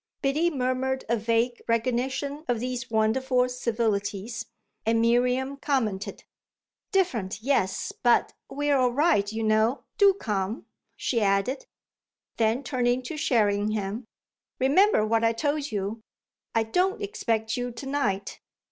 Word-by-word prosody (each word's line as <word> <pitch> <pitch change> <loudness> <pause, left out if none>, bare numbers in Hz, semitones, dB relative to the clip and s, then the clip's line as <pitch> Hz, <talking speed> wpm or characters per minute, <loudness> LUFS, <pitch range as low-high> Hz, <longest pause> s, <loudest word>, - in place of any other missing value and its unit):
Biddy 300 +5 +2
murmured 260 -2 -1
a 235 - +3
vague 230 +2 0
recognition 260 +5 -1
of 240 -2 0
these 250 +1 -4
wonderful 250 +3 +2
civilities, 225 -3 -2 0.4
and 225 +1 +2
Miriam 250 +4 +2
commented: 225 -9 -2 0.7
"Different, 230 - 0
yes; 250 -8 0
but 240 -1 +3 0.2
we're 290 0 +1
all 255 -2 +3
right, 280 -8 +2
you 225 0 -3
know. 220 +4 +2 0.2
Do 400 -2 +6
come," 210 - -3 0.3
she 235 -3 0
added. 200 +7 +1 0.7
Then 225 +4 +1
turning 250 -1 0
to 280 +6 -5
Sherringham: 215 -3 0 0.5
"Remember 285 - +4
what 225 +1 +1
I 230 0 +3
told 290 +3 -1
you 205 +2 -3 0.5
I 225 - +4
don't 360 - +1
expect 230 - -1
you 245 0 -2
to 235 +4 -8
night." 235 -9 -2
240 Hz, 125 wpm, -26 LUFS, 220-270 Hz, 0.7 s, Do